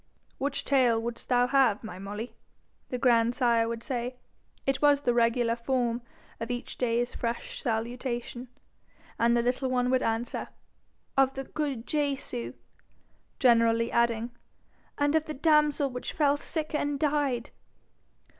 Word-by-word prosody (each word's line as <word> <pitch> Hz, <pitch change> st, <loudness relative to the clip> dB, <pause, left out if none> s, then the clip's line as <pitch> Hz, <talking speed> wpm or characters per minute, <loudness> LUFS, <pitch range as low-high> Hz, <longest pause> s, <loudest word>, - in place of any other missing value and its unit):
'Which 280 Hz, +1 st, -1 dB
tale 250 Hz, -5 st, +3 dB
wouldst 235 Hz, +1 st, -6 dB
thou 245 Hz, -1 st, +4 dB
have, 250 Hz, -5 st, +3 dB
my 185 Hz, -4 st, -7 dB
Molly?' 205 Hz, +4 st, -6 dB, 0.6 s
the 250 Hz, -, -2 dB
grandsire 235 Hz, -1 st, +3 dB
would 230 Hz, 0 st, -4 dB
say: 250 Hz, -1 st, -3 dB, 0.5 s
it 270 Hz, 0 st, 0 dB
was 290 Hz, -1 st, +5 dB
the 245 Hz, -4 st, +2 dB
regular 235 Hz, 0 st, +2 dB
form 240 Hz, 0 st, -1 dB, 0.4 s
of 230 Hz, +1 st, -4 dB
each 245 Hz, 0 st, -5 dB
day's 240 Hz, 0 st, 0 dB
fresh -, -, -4 dB
salutation; 240 Hz, +1 st, -3 dB, 0.7 s
and 235 Hz, +1 st, +4 dB
the 235 Hz, -, +2 dB
little 250 Hz, +2 st, 0 dB
one 250 Hz, 0 st, +1 dB
would 260 Hz, 0 st, +3 dB
answer, 225 Hz, +1 st, -2 dB, 0.7 s
'Of 270 Hz, 0 st, +4 dB
the 270 Hz, -, -3 dB
good 275 Hz, -5 st, -3 dB
Jesu,' 275 Hz, -, -2 dB, 0.8 s
generally 230 Hz, -2 st, +4 dB
adding, 235 Hz, 0 st, +1 dB, 0.7 s
'and 290 Hz, 0 st, +2 dB
of 315 Hz, -1 st, +2 dB
the 310 Hz, -, -5 dB
damsel 300 Hz, -2 st, +3 dB
which 250 Hz, 0 st, -5 dB
fell 285 Hz, -2 st, +3 dB
sick 310 Hz, +1 st, -4 dB
and 290 Hz, -1 st, -1 dB
died.' 285 Hz, -5 st, 0 dB
245 Hz, 135 wpm, -28 LUFS, 235-275 Hz, 0.8 s, was